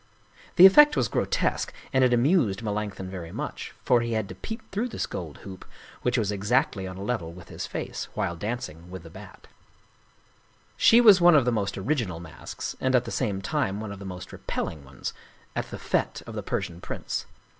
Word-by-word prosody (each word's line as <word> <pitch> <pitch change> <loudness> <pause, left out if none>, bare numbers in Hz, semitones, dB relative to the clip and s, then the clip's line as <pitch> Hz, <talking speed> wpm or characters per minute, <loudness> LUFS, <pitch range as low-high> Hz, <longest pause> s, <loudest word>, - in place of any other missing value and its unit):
The 180 - +10
effect 295 +10 +8
was - - +2
grotesque, - - 0 0.2
and 130 -1 +4
it 125 - +4
amused 120 - +3
Melanch 105 -1 -2
thon 95 - -6
very 90 -3 -7
much, - - -6
for 120 -2 +4
he 115 0 -2
had 110 -2 -1
to - - -6
peep 225 +1 -8
through 215 +5 -1
this 240 - -3
gold 80 -5 -6
hoop, 95 -2 -9 0.4
which 125 +1 +1
was 105 -3 +1
exactly 105 0 +1
on 95 0 -7
a 95 - -6
level 100 -7 -2
with 85 -1 -13
his - - -5
face, - - -5
while 85 - -1
dancing 90 -4 -5
with 95 -2 -8
the 80 - -12
Bat. - - -12 1.3
She 235 +2 +6
was 205 -6 +8
one 175 -1 +7
of 140 -5 +5
the 125 - +2
most 100 -4 -1
original 100 - -1
masks 80 -2 -7
and 130 0 +2
at 125 -1 +3
the 115 - -5
same 100 -6 -1
time 95 +1 -1
one 110 -2 -5
of 100 - -8
the 100 - -8
most 90 -1 -7
repelling 75 -3 -4
ones 65 -1 -6 0.4
at - - -3
the - - -6
fete - - -1
of - - -8
the - - -3
Persian 85 0 -3
prince. - - -4
105 Hz, 205 wpm, -26 LUFS, 95-130 Hz, 1.3 s, The